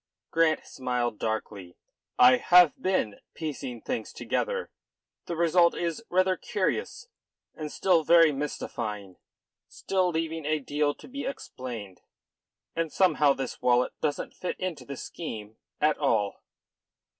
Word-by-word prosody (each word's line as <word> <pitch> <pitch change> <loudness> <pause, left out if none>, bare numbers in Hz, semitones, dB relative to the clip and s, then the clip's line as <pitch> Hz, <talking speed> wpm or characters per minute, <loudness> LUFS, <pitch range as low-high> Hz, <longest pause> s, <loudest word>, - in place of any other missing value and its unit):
Grant 160 -1 +2
smiled 125 -3 -2
darkly. 105 -5 -4 0.4
"I 125 +1 +8
have 180 0 +6
been 185 - 0 0.2
piecing 135 -6 -5
things 110 - -3
together. 480 -1 -2 0.6
The 170 - -3
result 170 +1 +4
is 170 +5 -3
rather 185 0 +2
curious, 210 - -2 0.5
and 150 -1 -6
still 175 -4 +3
very 165 0 +6
mystifying, 110 -9 -4 0.5
still 185 -2 0
leaving 165 -1 -2
a 155 +2 +1
deal 145 +1 -1
to - - -14
be 280 +2 -5
explained, 120 - -7 0.7
and 165 -2 -1
somehow 150 -6 +4
this 135 -2 -5
wallet 125 0 +3
doesn't 145 -2 -2
fit 180 - -5
into 185 -4 -4
the 140 -1 -7
scheme 110 -9 -7 0.2
at 150 0 +2
all." 105 -8 +1
150 Hz, 125 wpm, -28 LUFS, 125-170 Hz, 0.7 s, I